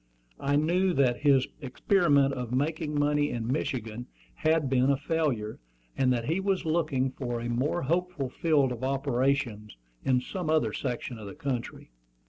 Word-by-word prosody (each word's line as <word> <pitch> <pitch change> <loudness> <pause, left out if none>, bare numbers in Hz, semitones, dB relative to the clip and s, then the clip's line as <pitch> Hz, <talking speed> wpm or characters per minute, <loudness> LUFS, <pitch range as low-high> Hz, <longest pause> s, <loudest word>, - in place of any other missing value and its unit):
I 140 +1 +1
knew 175 +5 +2
that 130 -5 +2
his 140 -3 +4
experiment 140 0 +2
of 125 -3 -4
making 150 +3 -1
money 145 0 +2
in 115 -2 -3
Michigan 120 -3 -3 0.3
had 155 - +1
been 130 0 +3
a 140 - +3
failure, 140 -8 -1 0.4
and 130 -1 +2
that 120 -2 0
he 165 +7 0
was 195 -2 0
looking 155 -5 +1
for 120 -3 -4
a 120 - -4
more 130 +8 0
hopeful 170 -1 -1
field 145 -5 +2
of 125 0 -5
operations 130 - -1 0.3
in 130 -1 +3
some 170 +6 -4
other 150 -9 +2
section 125 -2 -4
of 105 - -8
the - - -8
country. 135 - -4
135 Hz, 160 wpm, -28 LUFS, 125-155 Hz, 0.4 s, his